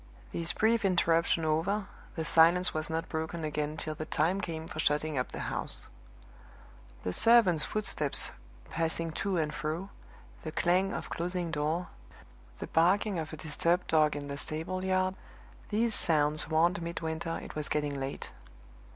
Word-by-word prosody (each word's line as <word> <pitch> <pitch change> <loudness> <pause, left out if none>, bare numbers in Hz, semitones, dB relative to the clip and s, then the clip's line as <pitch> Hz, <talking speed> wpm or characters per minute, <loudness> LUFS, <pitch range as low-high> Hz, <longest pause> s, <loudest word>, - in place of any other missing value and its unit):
This 170 0 -1
brief 225 +1 +2
interruption 170 -3 +2
over, 175 +7 0 0.3
the 160 - -3
silence 170 +3 +4
was 155 +1 -1
not 160 0 -2
broken 160 +1 -4
again 150 0 -2
till 155 -1 -2
the 155 0 -6
time 175 +6 +1
came 160 -3 -5
for 155 - -7
shutting 150 0 +1
up 125 -1 -2
the - - -6
house. - - -1 1.2
The 90 - -2
servants' 205 - +5
footsteps 195 -9 0 0.4
passing 165 0 -1
to 195 +3 -2
and 155 -2 -1
fro, 160 +6 -4 0.5
the 155 - -6
clang 185 +4 +1
of - - -5
closing 175 0 -2
doors, 155 +3 -1 0.7
the - - -5
barking 185 +3 +2
of 160 0 -5
a 155 - -7
disturbed 170 +3 0
dog 155 -2 +3
in 145 -1 -5
the 140 0 -5
stable 165 +6 -3
yard 185 0 +1 0.6
these 225 +2 +2
sounds 150 -4 +5
warned 170 +4 +2
Midwinter 165 0 -4
it - - -9
was 150 -1 -2
getting 145 -2 -1
late. 135 +1 -5
165 Hz, 155 wpm, -30 LUFS, 155-180 Hz, 1.2 s, servants